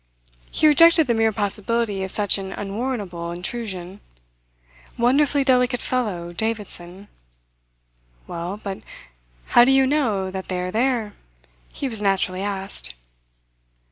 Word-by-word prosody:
He - - 0
rejected 330 +1 +7
the 240 - +1
mere 225 -1 +2
possibility 210 0 -1
of 190 - -4
such 205 0 +2
an 190 0 -6
unwarrantable 200 -5 -4
intrusion. 185 0 -6 1.0
Wonderfully 275 +4 +3
delicate 250 -2 +2
fellow, 190 -9 -2
Davidson! 200 -2 -4 1.2
"Well, 175 +4 -5
but 195 -2 -6 0.7
how 240 - +9
do 255 - +4
you 270 0 +5
know 225 -10 0
that 190 0 -6
they 185 -1 -2
are 180 0 -3
there?" 230 -2 0 0.6
he 280 - -4
was 225 -4 -4
naturally 190 -2 0
asked. 195 - -2
210 Hz, 120 wpm, -22 LUFS, 190-245 Hz, 1.2 s, how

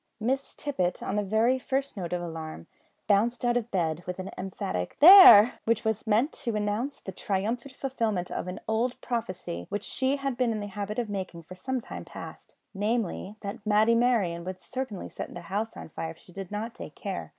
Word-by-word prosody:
Miss 265 +5 -1
Tippet, 185 -12 -2
on 195 - -2
the 210 - +2
very 220 +6 +2
first 270 +1 -2
note 180 -4 -5
of 175 -1 -2
alarm, 160 - -6 0.4
bounced 230 +5 +2
out 240 0 +2
of 240 -1 -1
bed 165 -4 0
with 180 - -4
an 190 +1 -6
emphatic 95 - -4
"There!" 345 - +10
which 225 -1 +1
was 220 +1 -1
meant 225 +8 +2
to 235 -5 -3
announce 210 +7 -1
the 190 - -7
triumphant 225 +8 -2
fulfilment 225 -10 -2
of - - -3
an 180 - -5
old 230 +3 0
prophecy 185 - -4
which 205 - -3
she 265 +1 0
had 275 -3 -3
been 250 -2 +2
in 220 - -2
the 205 - -4
habit 205 +1 -5
of 240 -2 -1
making 185 -4 -5
for 175 - -11
some 255 +7 -3
time - - -8
past; - - -10 0.2
namely, 210 -1 -1
that 200 +1 -6
Matty 215 +2 +4
Merryon 225 -8 +2
would 185 +1 -6
certainly 255 -3 -5
set - - -7
the 175 - -6
house 205 +6 -3
on - - -8
fire 160 +1 -5
if 160 - -10
she 180 - -15
did 195 -1 -7
not 220 +3 -4
take - - -9
care! - - -5
210 Hz, 205 wpm, -28 LUFS, 185-240 Hz, 0.4 s, There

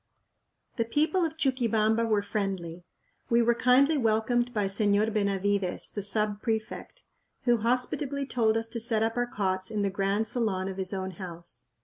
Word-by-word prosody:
The 230 - +1
people 310 +10 +1
of 320 -1 -2
Chuquibamba 230 -5 +1
were 210 -2 +1
friendly. 190 -4 -3 0.5
We 235 0 +4
were 235 +1 +4
kindly 270 +6 +4
welcomed 240 +1 +1
by 210 -4 0
Señor 205 +2 +2
Benavides, 200 -2 0
the 205 - -4
sub 205 +1 -1
prefect, 225 - -4 0.4
who 240 -2 +3
hospitably 255 +5 -1
told 225 -4 +1
us 225 0 -2
to 230 0 -4
set 220 -1 +1
up 225 +1 0
our 245 0 0
cots 190 -4 -2
in 210 -2 -1
the 200 - 0
grand 195 +2 0
salon 210 -5 -1
of 190 -1 -5
his 190 -1 -4
own 190 -1 -3
house. 170 -2 -8
220 Hz, 165 wpm, -28 LUFS, 200-240 Hz, 0.5 s, We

